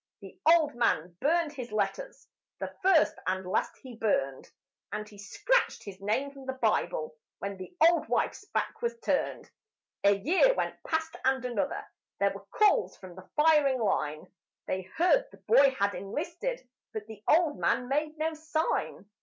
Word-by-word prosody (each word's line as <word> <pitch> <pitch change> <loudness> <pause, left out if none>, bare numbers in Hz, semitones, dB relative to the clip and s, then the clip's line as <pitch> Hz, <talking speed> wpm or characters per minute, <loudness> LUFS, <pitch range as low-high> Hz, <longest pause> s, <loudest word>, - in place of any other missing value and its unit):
The - - -11
old 320 -3 +5
man 180 -8 0
burned 325 +1 +2
his 250 -5 -7
letters, - - -3 0.3
the - - -5
first 370 -5 +4
and 185 0 -1
last 185 +4 -1
he 255 -3 -9
burned, 135 -12 -1 0.4
And 210 0 -4
he 205 -1 -15
scratched 485 - 0
his 195 -1 -10
name 255 +8 -1
from 275 -1 -13
the 265 - -1
Bible 210 -9 0 0.2
when 200 0 -5
the 190 - -10
old 340 0 +2
wife's - - -1
back 445 +1 -3
was 470 0 -1
turned. - - -1 0.5
A 200 0 +6
year 365 - +3
went - - -3
past 320 0 -1
and 265 -1 +1
another. 240 -5 -2 0.3
There - - +3
were - - -11
calls 425 -1 +2
from 185 -2 -11
the 185 +1 -13
firing 300 -4 +4
line; 155 -8 -1 0.4
They 185 0 -3
heard - - +4
the - - -16
boy 280 -11 +7
had 200 0 +1
enlisted, 325 - -4 0.3
but 215 -1 -5
the 215 -1 -11
old 315 -2 +3
man 245 - +1
made 300 +3 -1
no 320 +1 -1
sign. 315 -6 -2
265 Hz, 165 wpm, -29 LUFS, 200-325 Hz, 0.5 s, boy